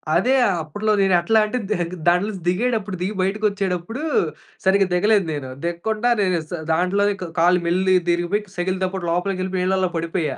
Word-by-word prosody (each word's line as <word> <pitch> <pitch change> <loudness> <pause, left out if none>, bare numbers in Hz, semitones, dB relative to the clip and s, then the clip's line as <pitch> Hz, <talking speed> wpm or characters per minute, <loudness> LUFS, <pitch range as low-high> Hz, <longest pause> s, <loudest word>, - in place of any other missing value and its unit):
అదే 245 +10 +3 0.3
అప్పు‌ట్లో 205 +8 -2
నేనెట్లా 190 +3 +3
అంటే, 250 +4 -3
దగే 175 -5 0 0.2
దాంట్లోంచి 185 +2 +1
దిగేటప్పుడు 210 0 0
దిగి 195 +4 -1
బయటకొచ్చేటప్పుడు 200 - -1 0.6
సరిగ్గా 195 0 +4
దిగలేదు 205 +1 +3
నేను. 135 -3 -5
దిగ్కుండా 215 +8 -1
నేను 185 -3 +1
స - - -21 0.2
దాంట్లోనే 200 +4 +1 0.3
కళ్ళు 180 +1 +4
మెల్లిగా 185 +1 +3
తిరిగిపోయి 175 +5 0
సైకిలుతోపాటు 185 0 -2
లోపలికెళ్ళిపోయి 185 +1 -1
నీళ్లలో 190 -1 +1
పడిపోయా. 165 -3 -2
185 Hz, 135 wpm, -21 LUFS, 175-205 Hz, 0.6 s, సరిగ్గా